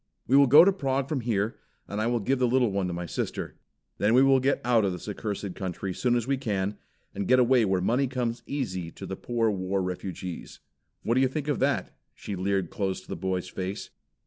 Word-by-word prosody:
We 130 - +2
will 140 0 +7
go 150 +7 +9
to 195 - +4
Prague 135 -6 -1
from 145 -3 -2
here 110 -2 -1 0.3
and 105 +1 -3
I 110 - +1
will 120 0 +1
give 130 +6 0
the 125 - +3
little 125 -2 +2
one 95 -1 -1
to - - -3
my 85 0 -4
sister. - - -4 0.4
Then 110 +3 +3
we 130 - +7
will 135 -1 +5
get 135 +2 +1
out 120 -3 +4
of 95 -2 0
this 90 - -8
accursed 100 -2 -4
country 95 0 -4
soon 120 +5 +1
as 120 -2 0
we 135 +1 0
can, 100 -5 -2 0.3
and 100 -1 -3
get 130 - +5
away 125 -2 +4
where 95 -2 +1
money 125 +8 +2
comes 125 -2 -2
easy 95 - -3
to - - -8
the 95 - -5
poor 115 +1 0
war 95 0 -1
refugees. 90 -1 -5 0.4
What 115 - +1
do 130 - +3
you 135 - +4
think 145 +2 -4
of 145 -4 0
that?" - - 0 0.2
She 100 - -6
leered 95 -1 -1
close 95 -2 -2
to - - -21
the - - -3
boy's 95 -1 -2
face. 95 +2 -5
110 Hz, 230 wpm, -27 LUFS, 95-130 Hz, 0.4 s, go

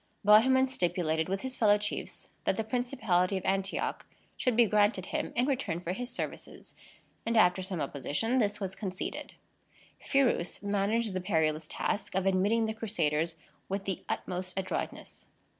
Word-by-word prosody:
Bohemond 260 +5 +6
stipulated 170 -6 0
with 195 +1 -1
his 260 -1 -4
fellow 210 -3 +5
chiefs 205 0 -5
that - - +1
the 220 - 0
principality 220 -6 0
of 190 - -6
Antioch 195 0 -1 0.3
should 250 -3 0
be 240 0 +6
granted 205 -3 +2
him - - -3
in 245 - +3
return 255 - -1
for 180 0 -3
his 245 +5 -5
services; 250 - -6 0.5
and, 230 0 0
after 180 -3 +5
some 185 -2 -3
opposition, 225 - -1
this 210 -2 +1
was 190 -2 -3
conceded. 190 -2 -5 0.7
Phirous 255 - +1
managed 205 +2 +1
the 185 - -2
perilous 160 -4 +1
task 205 - -2
of 190 0 +1
admitting 200 +4 +3
the 220 - -2
Crusaders 165 -7 0 0.3
with 195 0 -2
the 190 -2 -2
utmost 185 0 -3
adroitness. 190 -1 -4
200 Hz, 155 wpm, -30 LUFS, 180-225 Hz, 0.7 s, Bohemond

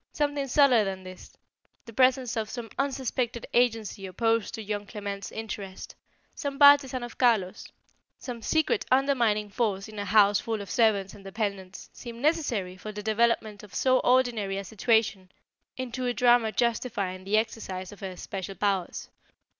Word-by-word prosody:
Something 290 -2 -1
subtler 260 -4 +5
than 190 -1 -4
this 185 0 -11 0.5
the 230 - -11
presence 255 0 +3
of 220 -1 -2
some 235 -2 -7
unsuspected 255 -3 -2
agency 225 -5 +1
opposed 225 +4 0
to 220 - -7
young 205 0 -4
Clement's 200 -2 -6
interest; 200 -3 -7 0.4
some 280 -2 -4
partisan 280 -3 +6
of 240 - -9
Carlos; 220 -7 +2 0.5
some 245 -3 -7
secret 315 - +1
undermining 240 -6 +2
force 200 -4 -1
in 215 -1 -9
a 205 - -3
house 205 0 +5
full 225 -1 -3
of 200 -2 -7
servants 205 -4 +2
and 205 - -13
dependants, 195 -2 -5
seemed 235 -2 -9
necessary 255 - 0
for 215 +3 -7
the 210 0 -7
development 220 -1 +1
of 210 - -13
so 255 -1 +3
ordinary 240 -6 +2
a 200 - -3
situation 220 -2 0 0.5
into 255 0 -3
a 245 - -1
drama 240 -2 +4
justifying 215 -6 -1
the 200 +3 +1
exercise 195 -4 -3
of 205 - -13
her 190 -3 -6
special 195 +1 -6
powers. 195 -4 -1
220 Hz, 155 wpm, -27 LUFS, 200-245 Hz, 0.5 s, partisan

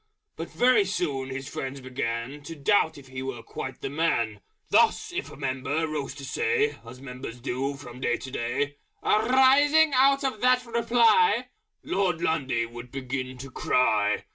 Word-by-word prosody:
But - - -6
very 245 -4 +4
soon 145 -9 -2
his 135 0 -5
friends 135 0 -5
began 130 +1 -4
To 165 - -7
doubt 160 +1 +2
if 135 -2 -14
he 130 0 -6
were 130 -3 -5
quite 130 -1 -7
the - - -3
man: 120 -9 0 0.3
Thus, - - +3
if - - -3
a - - -10
member 140 +4 -2
rose 145 -3 -4
to 140 -2 -8
say 445 - 0
(As 125 +2 -11
members 125 -2 -8
do 135 +2 -2
from 125 -3 -11
day 120 -2 +1
to 130 - -9
day), 145 +5 -2 0.3
"Arising 270 +7 +4
out 275 +2 +4
of 255 -6 -2
that 250 0 +3
reply 235 - +3 0.2
...!" - - -54
Lord 185 -4 0
Lundy 135 -8 0
would 120 +1 -10
begin 130 -1 -4
to 135 +1 -9
cry. 105 -6 +1
140 Hz, 165 wpm, -26 LUFS, -, 0.3 s, very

